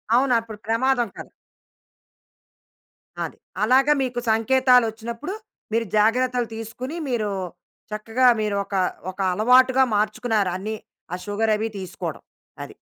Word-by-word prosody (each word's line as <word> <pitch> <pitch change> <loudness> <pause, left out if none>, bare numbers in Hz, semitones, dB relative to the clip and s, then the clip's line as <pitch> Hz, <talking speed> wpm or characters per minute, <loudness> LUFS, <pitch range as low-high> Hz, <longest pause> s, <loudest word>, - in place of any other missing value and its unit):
అవును. 255 0 +3
అప్పుడు 225 -2 -9
ప్రమాదం 240 +2 +2
కాదు. - - -9 2.0
అది. - - -9 0.3
అలాగా 265 +6 +5
మీకు 250 -2 -2
సంకేతాలు 250 +2 +4
వచ్చినప్పుడు, 235 - -6 0.4
మీరు 230 0 +1
జాగ్రత్తలు 245 +2 +2
తీసుకొని, 235 +7 -6
మీరు 220 -4 0 0.6
చక్కగా 225 +4 +1
మీరు 210 -1 -1
ఒక 200 - -6 0.4
ఒక 185 - -22
అలవాటుగా 255 +5 +5
మార్చుకున్నారు 215 -1 +1
అన్నీ 210 +4 -4 0.4
ఆ - - 0
సుగర్ 215 +2 0
అవి 220 +1 -2
తీసుకోవడం 185 -2 -6 0.4
అది. - - -11
230 Hz, 115 wpm, -23 LUFS, 215-255 Hz, 2.0 s, అలాగా